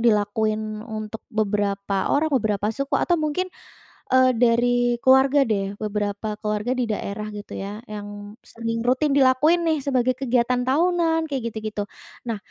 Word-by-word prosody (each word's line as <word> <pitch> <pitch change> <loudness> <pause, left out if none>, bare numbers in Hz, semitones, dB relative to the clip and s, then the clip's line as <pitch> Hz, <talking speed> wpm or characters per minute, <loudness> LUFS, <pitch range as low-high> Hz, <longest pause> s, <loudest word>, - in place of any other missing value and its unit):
dilakuin 215 -1 0
untuk 220 -1 -6
beberapa 200 -2 0
orang, 310 +2 +2
beberapa 210 -5 +1
suku, 275 +4 -3
atau 350 - +2
mungkin, 310 +5 -1 0.6
eee, 260 0 +5
dari 245 0 +3
keluarga, 265 +2 +5
deh. 200 -2 -1
Beberapa 210 0 -2
keluarga 215 +4 -1
di 250 - +1
daerah, 210 -1 -4
gitu 205 0 -8
ya, 200 +2 -5
yang 205 0 -8
sering 230 0 -4
rutin 275 +3 +2
dilakuin 285 +6 +4
nih, 320 -2 +2
sebagai 255 -2 +1
kegiatan 250 -1 +1
tahunan, 325 +2 +2
kayak 245 -4 -2
gitu-gitu. 215 -2 -4 0.4
Nah, 225 - -1
230 Hz, 140 wpm, -23 LUFS, 210-260 Hz, 0.6 s, eee